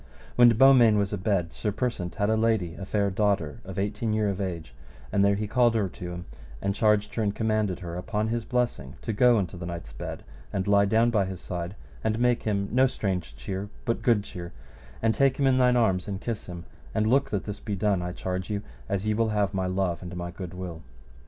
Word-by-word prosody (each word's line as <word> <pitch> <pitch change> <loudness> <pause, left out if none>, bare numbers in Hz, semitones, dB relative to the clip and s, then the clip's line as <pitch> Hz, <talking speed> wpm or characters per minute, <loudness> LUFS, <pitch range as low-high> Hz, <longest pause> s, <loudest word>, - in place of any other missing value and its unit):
When 120 -1 +8
Beaumains 120 -2 +6
was 100 0 0
abed, 95 -4 0
Sir 105 - -2
Persant 100 -6 -2
had 100 - +1
a - - +3
lady, 110 -6 +1
a 95 +2 -7
fair 100 -1 +1
daughter 95 -7 0
of 95 +1 -8
eighteen 105 +3 -1
year 110 -1 +1
of 100 0 -3
age, 85 -9 -4 0.4
and 100 - +3
there 100 0 +4
he 105 +2 -2
called 120 +2 +3
her 110 - +2
unto 90 -2 -5
him, 90 0 -6 0.3
and 100 - -1
charged 105 0 +2
her 115 - -1
and 105 -2 0
commanded 110 -4 0
her 85 -1 -5
upon 105 +4 -2
his 115 0 -1
blessing 115 - -1
to 115 - -2
go 120 +2 +5
unto 95 -2 -2
the 85 0 -6
knight's 85 -9 -7
bed, - - -6 0.3
and 95 - -1
lie 100 0 +5
down 115 +4 +3
by 105 -4 +2
his 95 -1 -6
side, 90 +1 -5 0.3
and 110 0 +1
make 120 0 +2
him 100 -2 -1
no 130 +2 +5
strange 95 -8 -3
cheer, 95 +1 -5 0.2
but 115 - 0
good 115 -4 +3
cheer, 85 -4 -8 0.5
and 115 0 +4
take 135 +1 +3
him 140 - +2
in 130 -1 +4
thine 125 -1 +4
arms 95 -6 +2
and 100 -2 -3
kiss 115 0 -4
him, 85 -1 -7 0.3
and 110 - +2
look 135 +5 +3
that 100 -2 -1
this 105 -1 -6
be 105 - -3
done, 100 -2 +1
I 90 0 -3
charge 90 +1 -4
you, 105 -1 -2 0.3
as 100 +1 -1
ye 110 - +2
will 115 +1 +1
have 105 -2 0
my 95 -1 0
love 90 -2 -1
and 90 -1 -7
my 85 0 -4
good 90 0 -7
will. 90 -3 -6
100 Hz, 230 wpm, -27 LUFS, 90-110 Hz, 0.5 s, When